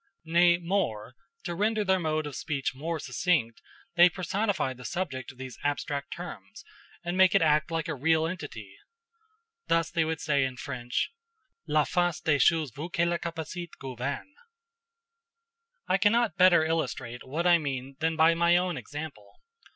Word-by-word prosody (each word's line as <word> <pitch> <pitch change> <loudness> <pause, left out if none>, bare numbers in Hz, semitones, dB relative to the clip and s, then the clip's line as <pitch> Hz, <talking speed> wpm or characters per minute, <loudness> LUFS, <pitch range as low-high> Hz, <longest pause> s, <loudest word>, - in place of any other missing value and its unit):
Nay, 170 +1 +5
more, 170 - -2 0.3
to 175 - -3
render 215 +4 +1
their 190 -1 +2
mode 155 -2 -1
of 145 -3 -6
speech 140 -4 -2
more 160 +4 -3
succinct, 135 -3 0 0.3
they 175 +1 +7
personify 185 -4 -1
the 125 0 -13
subject 130 -2 -4
of 130 - -21
these 130 -1 -8
abstract 145 0 -2
terms, 105 - -8 0.4
and 175 +1 -2
make 185 -1 +5
it - - +5
act 155 -1 +3
like 165 -2 -2
a 165 - -2
real 160 +3 +2
entity. 145 - -7 0.9
Thus 165 0 +1
they 165 - +2
would 160 -1 -2
say 140 -3 +1
in 130 -1 -3
French, 125 - -3 0.6
"La 150 0 +3
force 175 +1 0
des 150 -3 +1
choses 155 0 +3
veut 155 +9 -7
que 170 0 +2
les 170 0 0
capacites 170 +1 -6
gouvernent." 135 - -5 1.5
I 185 +1 +2
cannot 225 -1 +3
better 175 -3 +6
illustrate 130 -7 -2
what 155 +6 -3
I 175 -1 +6
mean 135 -2 -4
than 160 0 0
by 160 +1 +5
my 170 +1 +4
own 180 -2 -1
example. 145 -9 -8
160 Hz, 160 wpm, -28 LUFS, 135-175 Hz, 1.5 s, they